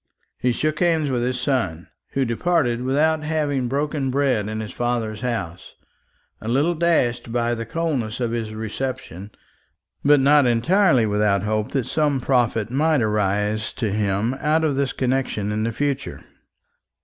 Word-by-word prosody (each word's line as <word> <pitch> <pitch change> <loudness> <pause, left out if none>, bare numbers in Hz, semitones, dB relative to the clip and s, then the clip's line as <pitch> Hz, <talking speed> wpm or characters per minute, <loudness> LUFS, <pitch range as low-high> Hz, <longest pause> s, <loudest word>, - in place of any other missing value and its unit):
He 125 - +1
shook 155 +5 -1
hands 160 -5 +2
with 125 -2 0
his 125 +1 -1
son, 95 - -1 0.3
who 135 -1 +1
departed 120 -1 0
without 155 +5 +1
having 150 -4 -1
broken 140 +1 -1
bread 130 -6 +1
in 110 0 -4
his 110 -1 -5
father's 115 -3 -2
house, 110 -9 -4 0.7
a 110 - -7
little 140 +9 +2
dashed 155 -9 +1
by 120 0 0
the 115 -1 -4
coldness 135 -8 -2
of 120 -2 -1
his 115 -2 -3
reception, 110 -3 -5 0.7
but 145 0 +5
not 140 0 +5
entirely 130 - +3
without 105 -2 +1
hope 105 0 -1
that 135 -4 0
some 145 0 +1
profit 120 -4 +1
might 150 0 +2
arise 105 0 0
to 110 -5 -2
him 105 +3 0
out 155 +2 +1
of 150 -3 +1
this 140 -1 0
connection 125 -5 -1
in 105 +1 -1
the 115 +1 0
future. 140 +2 -3
125 Hz, 155 wpm, -22 LUFS, 110-145 Hz, 0.7 s, but